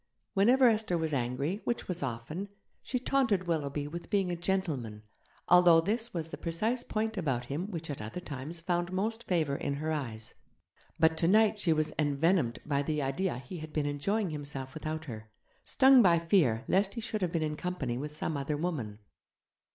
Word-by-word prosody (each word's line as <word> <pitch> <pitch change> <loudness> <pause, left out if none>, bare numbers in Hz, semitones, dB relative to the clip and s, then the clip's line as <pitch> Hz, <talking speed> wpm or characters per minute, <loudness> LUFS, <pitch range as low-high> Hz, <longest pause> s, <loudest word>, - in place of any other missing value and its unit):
Whenever 245 +6 +5
Esther 215 -6 +2
was 160 -2 -1
angry, 140 - -1
which 240 - -2
was 180 -2 -3
often, 140 +10 -4 0.3
she 255 - -2
taunted 245 -7 +1
Willoughby 145 -3 -1
with 170 +3 -7
being 195 -3 +1
'a - - -1
gentleman', 160 - -2 0.4
although 175 -2 +7
this 220 +7 0
was 165 -2 -4
the - - -7
precise 220 +9 0
point 220 -1 -2
about 130 -8 -1
him 155 +10 -4
which 165 -4 -5
at 145 -5 -5
other 110 +11 -5
times 155 0 -6
found 175 +1 -1
most 220 +5 -2
favour 160 -6 +1
in 140 - -2
her 155 +2 -2
eyes. 115 -8 -4 0.7
But 160 0 +4
tonight 210 +6 +4
she 180 -4 +2
was 155 -1 +1
envenomed 145 -2 +2
by 140 -2 +1
the 150 +1 -1
idea 150 +3 -1
he 130 +8 -8
had 155 0 -8
been 150 -2 0
enjoying 180 +7 -1
himself 140 -3 -5
without 155 0 -4
her, 110 -5 -8 0.3
stung 265 -1 +6
by 175 -5 +5
fear 160 - +2
lest 195 +3 +2
he 230 - -3
should 215 -1 -3
have 180 -2 0
been 165 -2 0
in 150 -1 -2
company 150 -9 -3
with 150 +2 -5
some 155 0 -2
other 140 +1 -2
woman. 145 -11 -3
165 Hz, 185 wpm, -30 LUFS, 140-190 Hz, 0.7 s, although